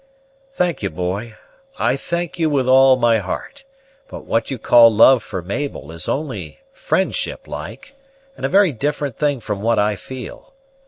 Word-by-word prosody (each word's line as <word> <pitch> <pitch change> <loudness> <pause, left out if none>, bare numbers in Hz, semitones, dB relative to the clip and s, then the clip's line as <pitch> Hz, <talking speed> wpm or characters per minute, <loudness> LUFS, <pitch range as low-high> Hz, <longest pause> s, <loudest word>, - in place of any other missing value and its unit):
"Thank'e, 170 - 0
boy; 100 +6 -4 0.4
I - - +1
thank 170 0 -4
you 160 -1 +2
with 135 -4 0
all 130 0 +6
my 115 -2 +3
heart; 270 - -6 0.4
but - - -10
what 115 0 -1
you 135 - -3
call 115 0 +6
love 115 +4 +6
for 95 -4 -6
Mabel 100 - -5
is 85 -1 -5
only 150 - -4
friendship - - -2
like, 285 0 -8 0.4
and - - -13
a - - +1
very 195 -2 +4
different 145 0 -3
thing 145 -3 +1
from 105 -3 -5
what 115 +2 +1
I 105 0 +2
feel. 130 - -10
130 Hz, 160 wpm, -19 LUFS, 110-150 Hz, 0.4 s, all